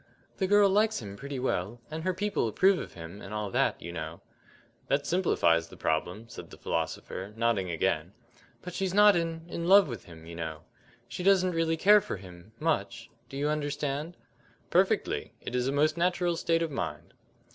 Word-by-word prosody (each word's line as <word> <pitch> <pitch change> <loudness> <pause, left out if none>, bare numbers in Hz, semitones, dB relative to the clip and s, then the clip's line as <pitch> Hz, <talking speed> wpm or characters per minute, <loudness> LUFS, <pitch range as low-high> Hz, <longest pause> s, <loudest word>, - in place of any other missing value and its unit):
"The 190 - 0
girl 205 +1 +6
likes 210 +3 +2
him 100 -3 -8
pretty 140 +5 -6
well, 120 -3 -2
and 160 +1 -4
her 185 +1 +1
people 205 - 0
approve 185 - +3
of - - -8
him, 85 +4 -9
and 100 +2 -7
all 105 -2 -3
that, - - +1
you 85 - -7
know." 80 -1 -6 0.7
"That 140 +1 +1
simplifies 85 - +2
the - - -14
problem," 90 +8 -1
said - - -10
the - - -12
philosopher, 90 +4 -3
nodding 115 -5 +1
again. 85 +1 -1 0.5
"But 180 - -7
she's 190 0 -2
not 210 -1 +7
in 165 -1 -2
in 170 0 -4
love 195 0 +7
with 120 -4 -7
him, 80 -2 -13
you 85 0 -9
know. 80 -2 -5 0.4
She - - -6
doesn't 185 -1 +4
really 165 -1 +1
care 205 +5 +6
for - - -5
him 90 +1 -13
much. 120 -7 -1 0.2
Do 135 - -7
you 145 +1 0
understand?" 150 +1 -2 0.5
"Perfectly. - - +1
It - - -7
is 125 0 0
a - - +1
most 155 +3 +2
natural 175 0 +1
state 165 0 +1
of 165 - -3
mind." 135 - -5
145 Hz, 190 wpm, -29 LUFS, -, 0.7 s, not